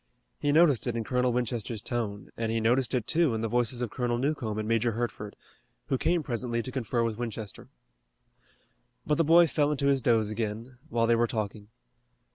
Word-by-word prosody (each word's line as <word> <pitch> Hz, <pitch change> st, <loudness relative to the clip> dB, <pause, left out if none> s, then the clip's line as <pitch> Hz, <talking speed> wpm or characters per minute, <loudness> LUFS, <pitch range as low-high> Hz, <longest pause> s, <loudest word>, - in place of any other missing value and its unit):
He 145 Hz, -, +1 dB
noticed 150 Hz, -6 st, +4 dB
it 120 Hz, -, -1 dB
in 115 Hz, -, -1 dB
Colonel 125 Hz, +2 st, +1 dB
Winchester's 120 Hz, -2 st, -2 dB
tone, 105 Hz, -3 st, -4 dB
and 115 Hz, -1 st, -2 dB
he 115 Hz, -, 0 dB
noticed 120 Hz, +3 st, +2 dB
it, 120 Hz, -4 st, -1 dB
too, 160 Hz, -6 st, +2 dB
in 110 Hz, -, -2 dB
the 115 Hz, -, -1 dB
voices 120 Hz, +1 st, 0 dB
of 120 Hz, -, -4 dB
Colonel 120 Hz, -2 st, -1 dB
Newcomb 125 Hz, -5 st, -2 dB
and 110 Hz, 0 st, -3 dB
Major 115 Hz, +1 st, +1 dB
Hertford, 110 Hz, -3 st, -4 dB, 0.5 s
who 135 Hz, -, +2 dB
came 170 Hz, -1 st, +1 dB
presently 120 Hz, -2 st, -2 dB
to 130 Hz, -, -6 dB
confer 120 Hz, -2 st, -1 dB
with 115 Hz, -1 st, -2 dB
Winchester. 110 Hz, -3 st, -6 dB, 1.4 s
But 150 Hz, +1 st, 0 dB
the -, -, +5 dB
boy 170 Hz, +2 st, +6 dB
fell 145 Hz, -1 st, +1 dB
into 145 Hz, -1 st, -1 dB
his 140 Hz, -1 st, +3 dB
doze 110 Hz, -3 st, +2 dB
again, 115 Hz, +3 st, -4 dB
while 115 Hz, -4 st, +1 dB
they 115 Hz, 0 st, +4 dB
were 120 Hz, +1 st, +2 dB
talking. 105 Hz, -2 st, -4 dB
120 Hz, 195 wpm, -28 LUFS, 110-130 Hz, 1.4 s, boy